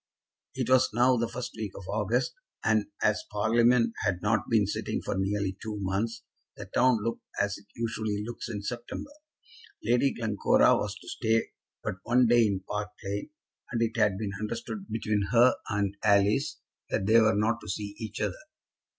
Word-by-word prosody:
It 130 -2 -1
was 130 0 +5
now 125 +2 +5
the 115 -1 0
first 120 +1 -5
week 105 -3 -5
of 95 - -9
August, 110 +5 0 0.3
and 110 -1 +3 0.2
as 105 0 +2
Parliament 115 +2 +3
had 95 -4 +1
not 105 -1 +1
been 110 -3 +4
sitting 100 - -2
for - - -3
nearly 95 0 -1
two 110 -1 -4
months, 100 +4 -2 0.3
the - - -7
town 125 -4 +2
looked 115 +1 -2 0.2
as 100 -1 0
it 100 - -22
usually 110 -3 -2
looks 120 0 -6
in 105 -3 -4
September. 120 - -5 0.7
Lady 125 +3 +3
Glencora 110 -3 +3
was 105 0 -2
to - - -16
stay 115 -1 0 0.3
but - - -3
one 125 +3 +3
day 120 -1 +5
in 95 -2 -1
Park 105 +2 -4
Lane, 100 +8 -3 0.4
and 120 - -1
it 115 0 -1
had 100 -2 +2
been 105 -1 -3
understood 195 - -5
between 105 -3 0
her 120 +2 +7 0.2
and 100 -1 0
Alice 105 +6 +3 0.3
that 95 - 0
they 115 +3 +6
were 110 -2 +4
not 115 +3 +1
to - - -9
see 100 -1 -4
each 110 -1 -6
other. - - 0
110 Hz, 175 wpm, -28 LUFS, 100-115 Hz, 0.7 s, her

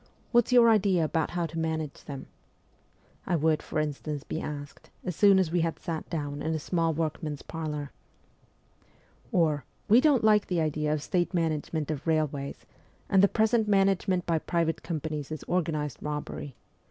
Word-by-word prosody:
What's 240 0 +3
your 240 -2 +7
idea 195 -6 +4
about 160 0 0
how 175 -1 -1
to 165 0 -5
manage 160 -2 -3
them? 140 -2 -7 0.5
' - - -34
I 175 - +2
would, 155 -1 +2
for - - -5
instance, 150 -1 -3
be 160 - -4
asked 145 -1 -7
as 180 - -3
soon 200 +1 +6
as 185 -4 +2
we 175 0 +2
had 165 0 -1
sat 165 -3 -5
down 145 -3 -3
in 160 0 -1
a - - -1
small 165 +1 0
workman's 155 -2 -3
parlour. 150 -3 -5 1.4
Or, 160 - +2
' - - -39
We 235 +4 +8
don't 285 -6 +4
like 210 -1 +4
the 180 -2 0
idea 150 -1 0
of 150 -1 -1
state 180 +1 0
management 160 -2 -1
of 150 +1 -5
railways, 150 -3 -1 0.4
and 190 - +5
the 200 - +7
present 220 +1 +2
management 195 -2 +2
by 165 -2 +1
private 165 0 -1
companies 155 -3 -4
is 155 - -5
organized 155 -5 -1
robbery. 150 -2 -5
160 Hz, 175 wpm, -28 LUFS, 150-185 Hz, 1.4 s, We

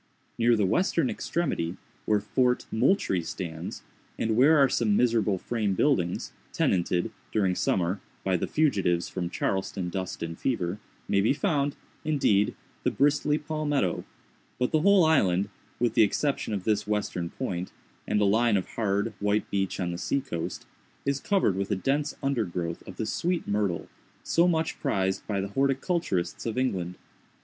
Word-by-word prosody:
Near 120 0 +5
the 105 -3 +2
western 190 - +2
extremity, 140 - -2 0.3
where 105 -1 +3
Fort 125 +4 +1
Moultrie 110 - +2
stands, 80 0 -6 0.3
and 110 -1 0
where 145 +7 +6
are 140 -2 +6
some 110 -5 +2
miserable 115 -5 +2
frame 105 -1 -1
buildings, 90 -9 +1 0.2
tenanted, 90 +3 +1 0.2
during 95 -4 +2
summer, 90 +1 0 0.2
by 95 -1 +1
the 90 - -1
fugitives 95 - +1
from 90 -2 -3
Charleston 95 -1 -2
dust 95 -1 -4
and 85 0 -5
fever, 100 -7 -1 0.3
may 100 - +3
be 110 +6 +3
found, 145 -4 0 0.3
indeed, 135 -10 +2 0.3
the - - +2
bristly 145 +1 +2
palmetto; 150 - -1 0.5
but 125 - 0
the 155 - +3
whole 195 -1 +6
island, 100 - +3 0.3
with 120 -2 +1
the - - +4
exception 135 +5 +1
of 100 -3 -2
this 105 0 0
western 105 -5 -1
point, 90 -8 -4 0.4
and 105 - +2
a 105 - +3
line 110 +2 +3
of 95 - -3
hard, 105 0 -1
white 105 +1 +1
beach 95 -1 -1
on 90 -2 -1
the 85 - -5
seacoast, 90 -10 -3 0.4
is 140 0 +1
covered 190 - +2
with 100 0 -2
a 105 - +1
dense 140 +9 0
undergrowth 90 -11 -1
of - - -8
the 110 - -2
sweet 170 +10 -1
myrtle, 100 -4 0 0.4
so 170 +2 +3
much 160 -2 0
prized 95 -9 -1
by 100 -2 -1
the 100 +1 -3
horticulturists 135 - 0
of 115 - -3
England. 95 -9 -1
105 Hz, 155 wpm, -27 LUFS, 95-140 Hz, 0.5 s, where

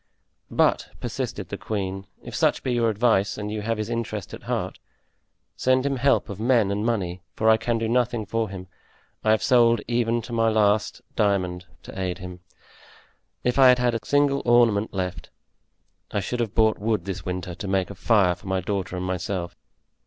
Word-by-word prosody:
"But," - - +2
persisted - - -4
the - - -5
queen, 95 -2 -4 0.2
"if - - -9
such - - +1
be 130 - 0
your 120 -1 +2
advice 105 -2 +2
and 105 0 -4
you 105 0 -3
have 115 +1 -1
his 110 -1 -3
interest 115 -5 -4
at - - -8
heart, - - -2 0.8
send 130 +1 +2
him 140 -1 0
help 140 +2 +2
of 100 -2 -7
men 115 -3 +3
and 100 +1 -1
money, 95 -6 -1
for 110 - 0
I 110 - +5
can 115 +1 -1
do 115 0 -1
nothing 120 -1 +1
for 115 +1 -1
him; 95 -1 -7 0.6
I 110 - +1
have 110 0 +3
sold 120 -3 +5
even 120 -1 0
to 120 - -8
my 115 -1 +3
last 105 -1 +1
diamond 90 -3 0 0.2
to - - -9
aid 90 -1 -2
him. 90 -1 -9 1.0
If 125 +2 +1
I 135 - +8
had 125 - +6
had 125 -1 +1
a 115 - -1
single 145 -1 +2
ornament 115 -3 +3
left, 90 -2 -4 0.8
I - - 0
should 120 +6 -3
have 115 -3 -2
bought 110 -1 +3
wood 105 -3 -1
this 95 -3 -5
winter 90 -1 -4
to 95 +4 -7
make 95 -1 0
a - - -6
fire 100 -4 +3
for 90 +2 -13
my 95 0 0
daughter 95 0 -3
and 90 - -3
myself." 90 -1 -3
110 Hz, 195 wpm, -24 LUFS, 95-120 Hz, 1.0 s, I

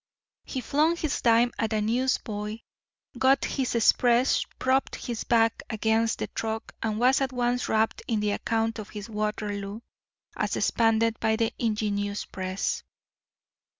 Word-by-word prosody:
He 260 - -4
flung 305 +7 +2
his 310 -3 -2
dime 235 +1 +4
at 225 -1 0
a 215 - +1
newsboy, 220 -2 -1 0.6
got 265 +1 +4
his 260 -3 -1
Express, 240 +2 +4
propped 260 +1 +1
his 235 -3 -4
back 225 -1 +3
against 220 0 +1
the - - -2
truck, 220 0 -4
and 215 -1 -1
was 255 +3 +4
at 265 -1 0
once 245 0 0
rapt 220 0 +1
in 225 -2 0
the 210 0 0
account 225 +2 -1
of 210 - -7
his 210 +1 -8
Waterloo, 210 0 -3 0.5
as - - -1
expanded 225 -1 +2
by 220 0 +2
the 225 +1 0
ingenious 205 -2 -1
press. 185 0 -3
225 Hz, 145 wpm, -27 LUFS, 215-245 Hz, 0.6 s, dime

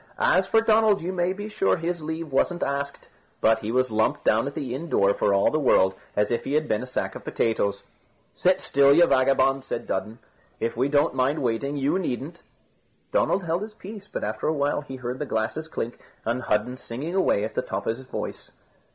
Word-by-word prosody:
As - - +3
for 225 - +4
Donald, 220 -2 +4
you 185 +2 -2
may 175 0 +1
be 205 +2 -5
sure 210 -3 +1
his 170 0 -3
leave 160 0 -5
wasn't 175 +6 +1
asked, 140 0 -3 0.3
but 110 0 +4
he 110 0 -4
was 130 0 +1
lumped 110 0 +1
down 115 +5 +3
at 140 - -6
the 125 -3 -3
inn 160 +6 -5
door 100 -6 +3
for 100 - +1
all 100 0 +3
the 155 - +1
world 95 -9 +4 0.2
as 105 +1 +1
if 120 - 0
he 140 - -3
had 155 0 +1
been 110 - 0
a 130 - -6
sack 125 - -2
of - - -9
potatoes. 100 -3 0 0.5
"Sit 185 +1 +2
still, 140 0 +4
you 175 +2 +7
vagabond," 135 -1 +3
said 120 -3 -4
Dudden; 110 +4 -3 0.4
"if 115 - -2
we 130 +4 +1
don't 145 +1 +3
mind 135 +3 0
waiting, 135 +5 -1
you 140 +7 +1
needn't." 160 +1 -4 0.7
Donald 195 - +2
held 170 +2 -1
his 210 0 -7
peace, 205 0 -10
but - - -4
after 110 +1 -2
a 155 - +2
while 145 0 0
he 135 -2 -8
heard 125 0 -5
the 150 - -2
glasses 110 +9 -2
clink, 120 -6 -5 0.3
and 120 +3 -1
Hudden 105 +5 0
singing 135 +9 -5
away 185 - +2
at 110 +1 -3
the - - 0
top - - -4
of 115 - 0
his 130 +2 -12
voice. - - -6
140 Hz, 220 wpm, -25 LUFS, 115-170 Hz, 0.7 s, you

